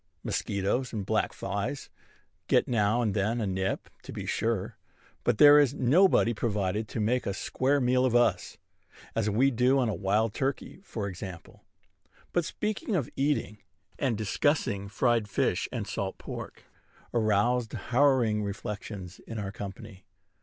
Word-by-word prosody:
Mosquitoes 100 Hz, +6 st, -1 dB
and 105 Hz, -3 st, -3 dB
black -, -, +1 dB
flies 100 Hz, +8 st, -4 dB, 0.6 s
get -, -, +3 dB
now 115 Hz, 0 st, +2 dB
and 105 Hz, -3 st, 0 dB
then 105 Hz, +4 st, 0 dB
a 110 Hz, -, -1 dB
nip, 95 Hz, 0 st, -2 dB
to -, -, -10 dB
be -, -, -6 dB
sure; 115 Hz, -4 st, -1 dB, 0.5 s
but 120 Hz, -3 st, +2 dB
there 145 Hz, +2 st, +9 dB
is 140 Hz, -2 st, +3 dB
nobody 135 Hz, -2 st, +4 dB
provided 105 Hz, -1 st, -1 dB
to 115 Hz, -, -5 dB
make 120 Hz, +4 st, +1 dB
a 100 Hz, -, -1 dB
square 135 Hz, +7 st, 0 dB
meal 125 Hz, 0 st, +2 dB
of 125 Hz, -2 st, +2 dB
us, 120 Hz, 0 st, +2 dB, 0.6 s
as 110 Hz, -2 st, +1 dB
we 125 Hz, +7 st, +3 dB
do 125 Hz, +3 st, +3 dB
on 125 Hz, -4 st, +2 dB
a -, -, -1 dB
wild 105 Hz, +4 st, +1 dB
turkey, 135 Hz, +7 st, -3 dB
for 110 Hz, -, -4 dB
example. 90 Hz, -2 st, -9 dB, 0.7 s
But 175 Hz, -2 st, +1 dB
speaking 210 Hz, +2 st, -2 dB
of 150 Hz, -9 st, -1 dB
eating, 135 Hz, -7 st, 0 dB, 0.4 s
and 125 Hz, -6 st, 0 dB
discussing 105 Hz, -2 st, 0 dB
fried 115 Hz, 0 st, +1 dB
fish -, -, 0 dB
and -, -, -3 dB
salt -, -, -4 dB
pork, -, -, -8 dB, 0.5 s
aroused 115 Hz, +1 st, +1 dB
harrowing 125 Hz, -5 st, +2 dB
reflections 100 Hz, -2 st, -6 dB
in 115 Hz, -, -6 dB
our 100 Hz, -2 st, -4 dB
company. 100 Hz, 0 st, -9 dB
115 Hz, 150 wpm, -28 LUFS, 100-130 Hz, 0.7 s, there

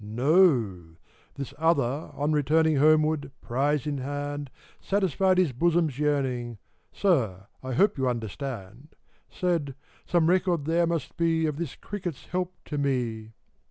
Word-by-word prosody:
No! 120 Hz, -, +3 dB, 0.5 s
This 140 Hz, -2 st, -6 dB
other, 145 Hz, -3 st, +1 dB
on 145 Hz, +2 st, 0 dB
returning 155 Hz, +1 st, +3 dB
Homeward, 155 Hz, -1 st, +3 dB
prize 140 Hz, +3 st, 0 dB
in 145 Hz, -2 st, -2 dB
hand, 145 Hz, +1 st, -4 dB, 0.3 s
Satisfied 190 Hz, -1 st, +1 dB
his 180 Hz, -6 st, +3 dB
bosom's 160 Hz, 0 st, +1 dB
yearning: 130 Hz, -6 st, -1 dB, 0.3 s
(Sir, 115 Hz, -, +1 dB, 0.2 s
I 130 Hz, 0 st, -4 dB
hope 195 Hz, -, +2 dB
you 130 Hz, -1 st, +2 dB
understand 120 Hz, +2 st, -6 dB
!) -, -, -38 dB
— -, -, -44 dB
Said 165 Hz, -7 st, -1 dB, 0.2 s
" -, -, -31 dB
Some 170 Hz, -2 st, +3 dB
record 180 Hz, -4 st, +2 dB
there 170 Hz, +2 st, +2 dB
must 165 Hz, -4 st, -3 dB
be 165 Hz, -1 st, +2 dB
Of 150 Hz, -2 st, -2 dB
this 165 Hz, -4 st, -4 dB
cricket's 180 Hz, -7 st, -6 dB
help 180 Hz, 0 st, -3 dB
to 150 Hz, -, -3 dB
me 120 Hz, -5 st, -2 dB
145 Hz, 145 wpm, -27 LUFS, 130-170 Hz, 0.5 s, No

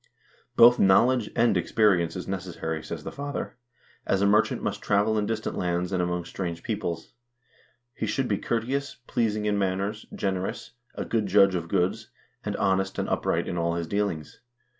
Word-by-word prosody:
"Both 120 Hz, +1 st, +7 dB
knowledge 115 Hz, +4 st, +4 dB
and 120 Hz, 0 st, +3 dB
experience 90 Hz, -7 st, +2 dB
is 90 Hz, -, -5 dB
necessary," 85 Hz, -4 st, -4 dB
says -, -, -7 dB
the -, -, -5 dB
father, 145 Hz, 0 st, -5 dB, 0.3 s
" -, -, -29 dB
as 95 Hz, -, +2 dB
a 100 Hz, -, +2 dB
mer 105 Hz, +2 st, +6 dB
chant -, -, -5 dB
must -, -, -2 dB
travel 105 Hz, +2 st, +2 dB
in 105 Hz, -1 st, 0 dB
distant 110 Hz, 0 st, -2 dB
lands 90 Hz, 0 st, -1 dB
and 95 Hz, -2 st, +1 dB
among 90 Hz, -1 st, -1 dB
strange 85 Hz, -3 st, -5 dB
peoples. 85 Hz, -2 st, -4 dB, 0.8 s
He -, -, -3 dB
should 135 Hz, -2 st, 0 dB
be 100 Hz, -, 0 dB
courteous, 130 Hz, +5 st, -2 dB
pleasing 110 Hz, -3 st, 0 dB
in 105 Hz, -1 st, +1 dB
manners, 100 Hz, +3 st, -2 dB
generous, 95 Hz, -1 st, -3 dB, 0.2 s
a -, -, -4 dB
good 110 Hz, -3 st, 0 dB
judge 100 Hz, 0 st, +5 dB
of 85 Hz, -2 st, -2 dB
goods, 90 Hz, +2 st, 0 dB, 0.3 s
and -, -, -3 dB
honest 95 Hz, 0 st, 0 dB
and -, -, -1 dB
upright -, -, 0 dB
in 85 Hz, -, -2 dB
all 85 Hz, 0 st, 0 dB
his 85 Hz, -1 st, -2 dB
dealings. 100 Hz, -4 st, -2 dB
100 Hz, 180 wpm, -26 LUFS, 90-110 Hz, 0.8 s, Both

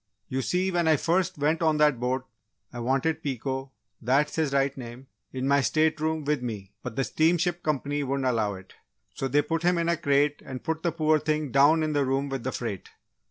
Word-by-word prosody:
"You 130 Hz, +1 st, -1 dB
see, 180 Hz, +7 st, 0 dB
when 175 Hz, -2 st, +1 dB
I 160 Hz, -, +5 dB
first 180 Hz, +4 st, 0 dB
went 150 Hz, +3 st, +1 dB
on 160 Hz, -2 st, +3 dB
that 150 Hz, -5 st, +3 dB
boat, 125 Hz, +1 st, -1 dB, 0.5 s
I 120 Hz, -, -6 dB
wanted 135 Hz, +6 st, 0 dB
Pico 135 Hz, -1 st, -3 dB, 0.3 s
that's 135 Hz, +5 st, +1 dB
his 155 Hz, -3 st, 0 dB
right 140 Hz, 0 st, +1 dB
name 125 Hz, 0 st, -9 dB, 0.3 s
in 130 Hz, 0 st, -3 dB
my 140 Hz, 0 st, +4 dB
state 155 Hz, +3 st, +1 dB
room 160 Hz, 0 st, -1 dB
with 150 Hz, -2 st, 0 dB
me 105 Hz, -5 st, -6 dB
but -, -, -6 dB
the 135 Hz, -, +1 dB
steamship 170 Hz, +4 st, +1 dB
company 145 Hz, -1 st, -1 dB
wouldn't 135 Hz, -1 st, -1 dB
allow 110 Hz, -5 st, +1 dB
it, 95 Hz, 0 st, -13 dB, 0.4 s
so 135 Hz, -, -2 dB
they 145 Hz, +3 st, +2 dB
put 165 Hz, +2 st, -2 dB
him 175 Hz, +1 st, +2 dB
in 170 Hz, 0 st, 0 dB
a 170 Hz, -, +2 dB
crate 145 Hz, -1 st, +1 dB
and 130 Hz, -1 st, -7 dB
put 160 Hz, 0 st, -2 dB
the 170 Hz, -, 0 dB
poor 155 Hz, -1 st, +2 dB
thing 155 Hz, -2 st, -1 dB
down 145 Hz, +4 st, +5 dB
in 155 Hz, -1 st, -1 dB
the 145 Hz, -1 st, +2 dB
room 135 Hz, +1 st, 0 dB
with 135 Hz, -3 st, -4 dB
the 130 Hz, -, -2 dB
freight! 115 Hz, -7 st, -5 dB
145 Hz, 215 wpm, -27 LUFS, 130-160 Hz, 0.5 s, I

